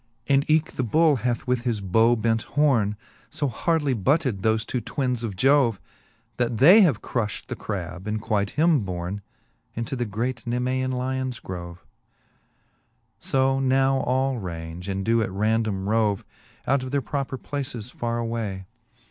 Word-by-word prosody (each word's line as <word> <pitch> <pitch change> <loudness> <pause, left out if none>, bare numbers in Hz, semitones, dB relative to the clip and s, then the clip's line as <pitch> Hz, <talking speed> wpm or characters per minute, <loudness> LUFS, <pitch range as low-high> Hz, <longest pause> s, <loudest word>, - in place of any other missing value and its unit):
VI. 140 - +2
And 140 +2 +2
eke 155 0 +3
the 130 - -2
bull 150 +5 +3
hath 120 +1 -2
with 125 -2 0
his 120 -3 -1
bow 110 +5 +3
bent 115 0 +1 0.2
home 120 -9 +3 0.3
So 145 - -2
hardly 145 +3 0
butted 125 - +1
thofe 110 +1 +1
two 125 - -2
twinnes 125 0 -2
of 105 -4 -3
Jove, 130 -1 +3 0.6
That 120 -2 0
they 180 - +8
have 150 - +3
crullit 110 -4 -2
the - - -4
crab, 95 -1 -5
and 105 0 -1
quite 105 -2 0
him 160 -1 +4
borne 95 0 -4 0.5
Into 115 +3 -3
the 120 -1 -1
great 120 +5 -3
Nemosan 130 +2 0
lions 130 0 -2
grove. 85 -1 -8 1.3
So 135 0 +1
now 135 0 +3
all 130 0 0
range, 85 -1 -6
and 95 0 -2
doe 115 +1 +3
at 110 - -1
random 105 -1 0
rove 105 -2 +1 0.4
Out 140 0 +2
of 130 - -5
their 140 0 0
proper 135 +4 -3
places 130 -5 -5
farre 120 0 -3
away. 115 -5 -3
120 Hz, 160 wpm, -25 LUFS, 105-135 Hz, 1.3 s, they